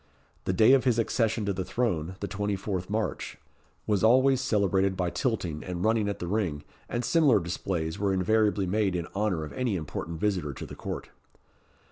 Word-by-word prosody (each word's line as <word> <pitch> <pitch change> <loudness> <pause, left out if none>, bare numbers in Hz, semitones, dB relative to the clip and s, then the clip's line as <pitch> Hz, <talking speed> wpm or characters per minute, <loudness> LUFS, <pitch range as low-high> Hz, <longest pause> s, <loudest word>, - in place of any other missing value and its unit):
The - - +1
day 110 +7 +6
of 135 - +5
his 125 -3 +2
accession 115 -1 +1
to 100 - 0
the 95 0 -2
throne 90 -6 -1
the 100 - -2
24th 100 -2 -3
March 105 -3 -2 0.5
was 105 -2 +1
always 130 +3 +5
celebrated 100 -5 +1
by 90 -2 0
tilting 90 - -2
and 90 -1 -4
running 110 -2 +2
at 100 - -3
the - - -5
ring, 90 -6 -1 0.3
and 120 0 -2
similar 150 -8 +4
displays 85 0 -3
were 100 -1 +1
invariably 105 +2 +2
made 95 0 +1
in 85 -1 -2
honour 100 -6 0
of 75 - -7
any 125 -5 -1
important 80 0 -5
visitor 90 -8 0
to - - -7
the - - -10
court. - - -6
100 Hz, 180 wpm, -28 LUFS, 90-110 Hz, 0.5 s, day